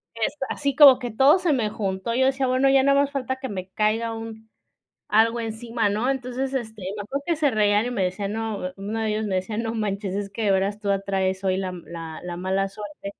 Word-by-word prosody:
este, 250 +5 -2
así 280 -2 -1
como 275 -3 +9
que 245 -2 -4
todo 270 - +5
se 345 -5 +2
me 225 -5 0
juntó, 195 +1 -3
yo 260 +2 +3
decía: 265 0 +1
"Bueno, 255 +2 +3
ya 270 0 +5
nada 280 0 +4
más 285 0 -1
falta 260 -1 -2
que 265 - -5
me 185 -2 -5
caiga 220 +3 0
un 225 0 -8 0.6
algo 230 +2 +3
encima, 225 0 -2
¿no?". 215 +5 0
Entonces, 265 0 -2
este, 220 -5 -4
me 205 - -4
acuerdo 275 +7 -4
que 340 -2 +1
se 295 -2 +2
reían 210 -1 +2
y 245 - -2
me 200 -6 0
decían, 195 +2 -2
no, 220 -4 -3
uno 205 +3 -4
de 220 - 0
ellos 215 0 -1
me 190 -2 -1
decía: 190 +4 -3
"No 225 0 -2
manches, 200 -3 -2
es 200 0 -3
que 220 +2 -4
de 200 - +3
veras 195 +2 0
tú 205 -1 -2
atraes 190 -1 0
hoy 190 -1 +1
la 190 -1 -2
m 180 -1 -8
la 165 -2 -7
la 175 -1 -5
mala 190 +2 0
suerte". 200 0 -9
220 Hz, 240 wpm, -24 LUFS, 195-255 Hz, 0.6 s, como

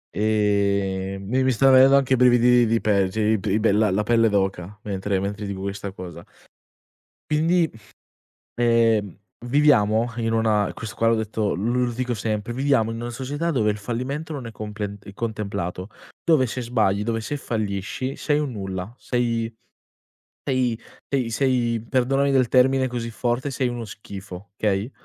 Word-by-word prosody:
Ehm, 100 -2 0
mi 130 +5 +1
mi 130 - +2
stan 135 +3 +4
venendo 135 +1 +7
anche 135 -1 +2
brividini 125 -1 +5
di 115 +1 +2
pe 100 -3 +2
cioè 110 +2 0
i 110 - +1
pe 100 - -4
i 100 +3 +2
bella 105 0 +3
la 95 +3 +1
pelle 115 +1 +3
d'oca, 95 -1 -1
mentre 100 -1 -2
mentre 100 +2 -4
dico 100 -1 -5
questa 100 0 -4
cosa. 85 -3 -9 1.1
Quindi, 165 +2 +2 0.8
ehm, 115 -5 +2 0.3
viviamo 120 -5 +3
in 115 -1 -1
una 110 -3 +2
questo 110 0 -7
qua 115 - +1
l'ho 115 - +4
detto 110 -1 -1
lu 110 +7 -1
lo 125 0 +2
ridico 125 +1 -2
sempre, 110 +1 -3
viviamo 130 -4 +1
in 115 0 -5
una 120 - -4
società 140 +7 -3
dove 110 -7 +2
il 105 - -5
fallimento 130 +9 -4
non 140 -5 -5
è 115 - -7
complent 105 -2 -6
contemplato, 100 -4 -4 0.3
dove 155 -6 +4
se 125 +2 -4
sbagli, 110 -4 +1
dove 115 +1 -1
se 115 +6 -4
fallisci 110 +1 -3
sei 150 -1 0
un 145 -3 -2
nulla, 95 -1 -5
sei 115 -2 -1 0.9
sei 125 -4 0 0.3
sei 130 -4 -1
sei 120 -3 0
perdonami 135 +2 +1
del 130 -3 +3
termine 130 +1 +4
così 120 -2 -4
forte, 120 +4 -2
sei 130 -1 -1
uno 120 -1 -4
schifo, 100 -2 -10
okay. 105 +2 0
115 Hz, 165 wpm, -23 LUFS, 105-125 Hz, 1.1 s, venendo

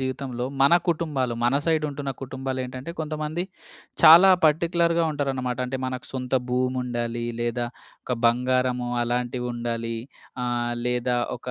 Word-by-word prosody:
జీవితంలో 130 -2 -3 0.2
మన 140 +5 +6
కుటుంబాలు 150 -8 0
మన 120 +3 +3
సైడ్ 160 -2 +2
ఉంటున్న 140 -1 -4
కుటుంబాలేంటంటే 130 +1 -5
కొంతమంది 155 +2 -3 0.6
చాలా 175 +4 +10
పార్టిక్యులర్‌గా 170 +1 +2
ఉంటారనమాట. 130 -4 -2
అంటే, 130 - -3
మనకు 130 -1 -4
సొంత 130 -1 -4 0.2
భూమి 125 +1 0
ఉండాలి 120 -1 -3 0.2
లేదా 120 0 -1 0.4
ఒక 125 - -2
బంగారము 125 0 +1
అలాంటివుండాలి. 120 -1 -2 0.5
ఆహ్, 120 -1 -1
లేదా 125 0 0 0.2
ఒక 120 - -18
130 Hz, 120 wpm, -25 LUFS, 120-145 Hz, 0.6 s, చాలా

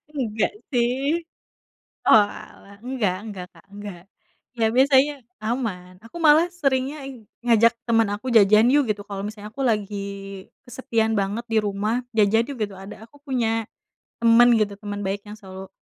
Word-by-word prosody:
Enggak 225 -5 -1 0.2
sih. 265 +7 0 0.8
Oalah, 205 -1 +1
nggak 240 -8 -1 0.2
nggak 180 -2 -8
Kak, - - -20
nggak. 205 -4 -8 0.6
Ya 225 - +3
biasanya 270 +2 +4 0.3
aman. 215 -6 -4
Aku 240 +9 -10
malah 315 +2 +6 0.2
seringnya 270 +1 0
i 250 -5 -10 0.2
ngajak 230 0 +5 0.2
teman 225 -1 +3
aku, 215 +5 -6
"jajan 215 +2 +6
yuk" 290 -2 +4
gitu, 205 -1 -5
kalo 195 -1 -5
misalnya 210 0 -7
aku 275 - -4
lagi 210 -3 0 0.7
kesepian 230 -3 -1
banget 205 +4 -2
di 225 - +1
rumah, 210 +5 -1
"jajan 215 +2 +4
yuk" 275 - -6
gitu. 205 -2 -3
Ada 205 +4 -11
aku 290 - -20
punya 225 -4 0 0.6
teman 235 +1 +6
gitu, 210 -2 +1
teman 205 -1 -5
baik 200 +1 -2
yang 210 - -8
selalu 190 -2 -10
225 Hz, 150 wpm, -23 LUFS, 205-255 Hz, 0.8 s, malah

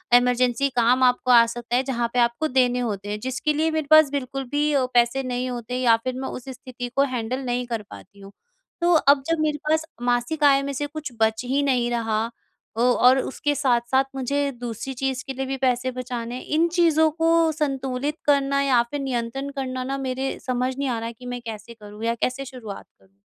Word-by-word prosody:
Emergency 250 +2 +3
काम 245 +2 +3
आपको 250 0 +3
आ 235 -1 +8
सकता 240 +1 -4
है 255 - +2
जहाँ 240 -3 -1
पे 250 - +1
आपको 240 +6 +1
देने 250 -2 +2
होते 205 -4 -3
हैं, 210 0 -3
जिसके 260 +5 -1
लिए 315 +2 +1
मेरे 315 -2 -2
पास 310 -2 +8
बिल्कुल 270 -1 -3
भी 295 +1 +1
अ, 265 -2 +2
पैसे 240 +2 +3
नहीं 250 0 -2
होते 245 0 -5
या 235 -3 +4
फिर 255 -1 -3
मैं - - -3
उस 250 - -8
स्थिति 255 -1 -7
को 275 - +4
हैंडल 240 +2 -2
नहीं 245 0 -1
कर 230 -3 -3
पाती 200 +1 -13
हूँ। 195 0 -12 0.5
तो 350 +1 +4
अब 280 -4 +4
जब 330 -1 +1
मेरे 300 -1 0
पास 315 0 +2 0.2
मासिक 245 +5 0
आय 275 -1 +6
में 280 0 -3
से 290 +2 -3
कुछ 305 -2 -7
बच 220 +1 +2
ही 270 +3 +1
नहीं 250 -3 +1
रहा 225 -2 0 0.5
अ, - - -2
और 250 +1 +5
उसके 290 +2 -2
साथ-साथ 260 -1 +2
मुझे 280 +2 -1
दूसरी 240 +2 -5
चीज़ 265 +1 -2
के 270 - -3
लिए 265 +1 -3
भी 270 +1 -3
पैसे 250 +1 0
बचाने 245 -1 -5
हैं। 255 - -7
इन 320 +3 +2
चीज़ों 320 -2 +4
को 330 0 +2
संतुलित 275 -1 -2
करना 280 -1 +2
या 260 -4 +4
फिर 290 - -3
नियंत्रण 260 +1 -3
करना 255 -1 -3
ना 270 +2 -3
मेरे 265 +1 -2
समझ 255 +1 -1
नहीं 280 -1 -1
आ 235 -2 -1
रहा 230 +1 -4
कि 235 +2 -14
मैं 245 - -7
कैसे 225 +1 -7
करूँ 210 -1 -11
या 230 - +1
कैसे 255 +3 -2
शुरुआत 240 -6 -9
करूँ? 195 +1 -28
255 Hz, 215 wpm, -23 LUFS, 240-280 Hz, 0.5 s, आ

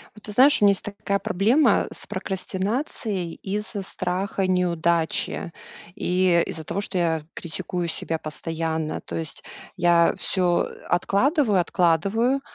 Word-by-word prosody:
Вот 215 - -15
ты 210 - -6
знаешь, 270 +4 +5
у - - +6
меня 200 - +7
есть 195 - 0
такая 205 -1 -2
проблема 225 +7 +3
с - - -4
прокрастинацией 195 - -3
из-за 205 +1 -4
страха 185 +1 -2
неудачи, 170 -1 0 0.4
и 180 -3 +2
из-за 160 - -5
того, 170 +5 -3
что 195 -2 -3
я 160 -3 0
критикую 175 +1 -4
себя 160 0 -2
постоянно. 160 0 -3
То - - -6
есть 160 -2 -5 0.3
я 170 -1 +4
всё 180 -2 +1 0.2
откладываю 210 - +2
откладываю. 195 - +2
185 Hz, 130 wpm, -24 LUFS, 170-205 Hz, 0.4 s, меня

